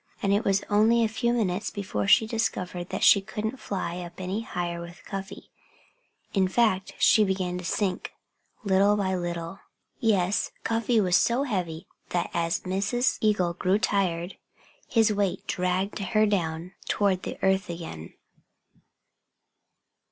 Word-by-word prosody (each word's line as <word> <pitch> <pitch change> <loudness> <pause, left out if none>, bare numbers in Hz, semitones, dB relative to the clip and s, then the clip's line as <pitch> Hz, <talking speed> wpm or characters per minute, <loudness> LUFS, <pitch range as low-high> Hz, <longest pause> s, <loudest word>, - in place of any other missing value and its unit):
And 200 0 +3
it 205 +3 +2
was 195 -2 +1
only 225 +3 +4
a - - +3
few 235 +2 0
minutes 210 -4 0
before 145 - -3
she 220 - +6
discovered 185 -6 -2
that - - -3
she 200 - +7
couldn't 220 +5 -4
fly 180 -3 -4
up 175 0 -9
any 190 +4 -2
higher 175 -5 -4
with 170 +1 -11
Cuffy. 195 0 -7 0.8
In 190 -2 +3
fact, 190 -2 +1
she 215 - +5
began 185 -2 -1
to - - -8
sink, 185 0 -1 0.5
little 200 +1 +3
by 190 -2 0
little. 175 0 -4 0.4
Yes, 200 -3 +1
Cuffy 230 0 +1
was 180 -3 +2
so 240 +7 +3
heavy 180 - -3 0.2
that 175 - -1
as 170 -1 0
Mrs. 200 +7 0
Eagle 195 -5 +2
grew 185 +3 +1
tired 185 -4 -1 0.5
his 225 -3 +3
weight 195 -2 -1
dragged 185 +3 -1
her 215 +2 +2
down 175 -4 -1 0.2
toward 195 -3 +1
the - - -6
earth 190 0 +2
again. 165 - -7
195 Hz, 145 wpm, -26 LUFS, 180-210 Hz, 0.8 s, she